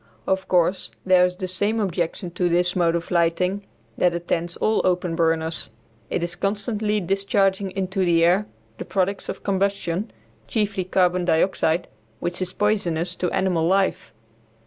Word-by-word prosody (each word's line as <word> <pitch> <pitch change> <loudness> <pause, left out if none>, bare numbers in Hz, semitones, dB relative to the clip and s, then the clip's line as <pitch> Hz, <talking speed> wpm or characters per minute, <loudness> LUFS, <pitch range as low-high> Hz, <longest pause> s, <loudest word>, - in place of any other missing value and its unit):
Of 190 0 0
course 180 +1 +2 0.2
there 185 -1 +5
is 180 - -6
the 185 0 -4
same 205 +5 0
objection 175 -2 -2
to 180 0 0
this 175 +1 +2
mode 170 -2 +2
of 170 0 -4
lighting 180 +3 +1 0.3
that 175 -1 +3
attends 170 0 -2
all 220 - +2
open 180 -2 0
burners; 160 -1 0 0.4
it 170 - -1
is 175 0 -2
constantly 210 +2 -1
discharging 195 +1 +1
into 190 0 -2
the 170 -2 +4
air 190 +5 +3 0.3
the - - -5
products 195 +1 -1
of - - -5
combustion, 195 -1 -1 0.4
chiefly 205 -5 -1
carbon 180 -1 +2
dioxide, 170 0 +1 0.3
which 175 +5 -3
is 180 -1 -2
poisonous 180 -4 0
to 180 - 0
animal 170 -3 +1
life. 190 -1 +1
180 Hz, 150 wpm, -23 LUFS, 175-195 Hz, 0.4 s, there